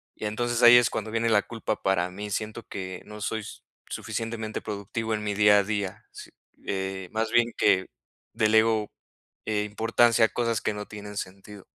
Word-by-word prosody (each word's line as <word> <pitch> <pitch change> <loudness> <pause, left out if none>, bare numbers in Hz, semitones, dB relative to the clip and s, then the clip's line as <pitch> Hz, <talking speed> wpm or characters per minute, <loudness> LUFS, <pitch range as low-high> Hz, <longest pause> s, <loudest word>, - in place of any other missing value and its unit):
Y - - -6
entonces 120 +3 -1
ahí 120 +1 +10
es 120 0 +4
cuando 110 -2 -4
viene 115 +1 +1
la 105 -3 +4
culpa 115 -2 -4
para 90 -2 +1
mí. 105 +3 -7
Siento 110 +3 -3
que 95 -2 -6
no 105 0 -10
soy 110 +1 -2 0.5
suficientemente 115 -1 -4
productivo 110 +2 -4
en 105 -1 -2
mi 105 -1 -2
día 105 0 +6
a - - +2
día, 100 -2 -3
si, - - -11 0.3
eh, 95 -1 -3
más 110 0 -1
bien 120 0 +3
que 95 0 +3 0.5
delego, 110 -1 +3 0.6
eh, 105 -1 +1
importancia 115 +2 +3
a - - 0
cosas 115 -2 0
que - - -1
no 105 0 -6
tienen 105 -1 -9
sentido. 100 +1 -8
105 Hz, 180 wpm, -26 LUFS, 100-115 Hz, 0.6 s, ahí